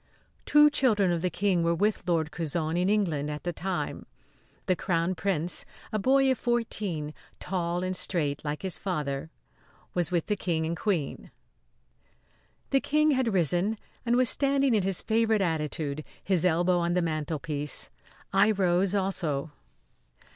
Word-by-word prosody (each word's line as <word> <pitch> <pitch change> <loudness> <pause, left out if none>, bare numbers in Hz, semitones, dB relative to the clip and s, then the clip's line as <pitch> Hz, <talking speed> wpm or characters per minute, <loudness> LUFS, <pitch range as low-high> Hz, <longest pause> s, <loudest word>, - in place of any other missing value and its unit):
Two 295 0 +6
children 215 -10 +2
of 170 -1 -1
the 180 - +1
King 185 0 +1
were 170 0 +2
with 205 +4 +1
Lord 165 -3 +1
Curzon, 160 -1 -1
in 180 +2 +1
England, 165 -9 0
at 150 0 -5
the 175 - -2
time. 185 +2 -4 0.6
The 185 - +2
Crown 170 0 0
Prince, 180 -2 0 0.3
a 215 - +1
boy 270 +4 +4
of 260 - -1
fourteen, 205 -10 -2 0.3
tall 175 -1 -2
and 185 0 -2
straight 165 -6 0
like 150 +2 -4
his 190 -2 -1
father, 150 -5 -3 0.6
was 175 -3 +1
with 175 -3 0
the 210 - 0
King 165 -5 -1
and 165 +1 -2
Queen. 170 -6 -2 1.4
The 270 - +3
King 305 +1 +2
had 260 -4 +1
risen 180 +4 +1 0.3
and 240 0 +1
was 255 0 +4
standing 275 0 +2
in 215 - +3
his 190 -1 -1
favourite 220 -1 +2
attitude, 155 -4 -2 0.2
his 185 -3 +1
elbow 175 +1 +3
on 170 0 0
the 180 - +2
mantelpiece. 155 -2 -2 0.4
I 195 +2 +5
rose 190 -1 +2
also. 165 -7 0
180 Hz, 155 wpm, -28 LUFS, 160-205 Hz, 1.4 s, Two